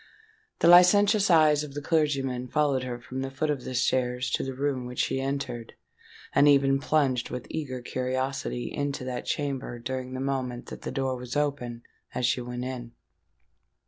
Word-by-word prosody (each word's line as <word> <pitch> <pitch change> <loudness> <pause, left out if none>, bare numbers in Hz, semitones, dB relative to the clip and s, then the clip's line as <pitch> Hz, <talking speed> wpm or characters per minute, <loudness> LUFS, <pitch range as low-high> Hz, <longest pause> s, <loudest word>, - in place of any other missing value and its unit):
The - - +5
licentious 200 +4 +6
eyes 155 -3 +5
of 145 -2 -9
the 145 - -3
clergyman 135 -6 0
followed 145 -2 +1
her 125 -1 -5
from 130 +2 -6
the 135 - -3
foot 150 +3 -1
of 135 -4 -3
the 130 - -5
stairs 125 0 +1
to - - +1
the 135 -1 -4
room 135 -2 -1
which 125 - -8
she 135 - 0
entered; 135 -4 -4 0.6
and 140 +1 +5
even 135 -1 +5
plunged 140 -4 +1
with 125 -1 -5
eager 130 -5 -4
curiosity 130 0 -2
into 145 -2 -2
that 125 -1 -4
chamber 135 -4 -2
during 130 +1 -4
the - - -4
moment 130 -2 -2
that - - -8
the - - -5
door 135 -1 -1
was 125 +1 -7
open 125 -5 -2 0.3
as 125 - 0
she 120 +1 +1
went 125 0 -5
in. 120 -2 -6
130 Hz, 175 wpm, -27 LUFS, 125-145 Hz, 0.6 s, licentious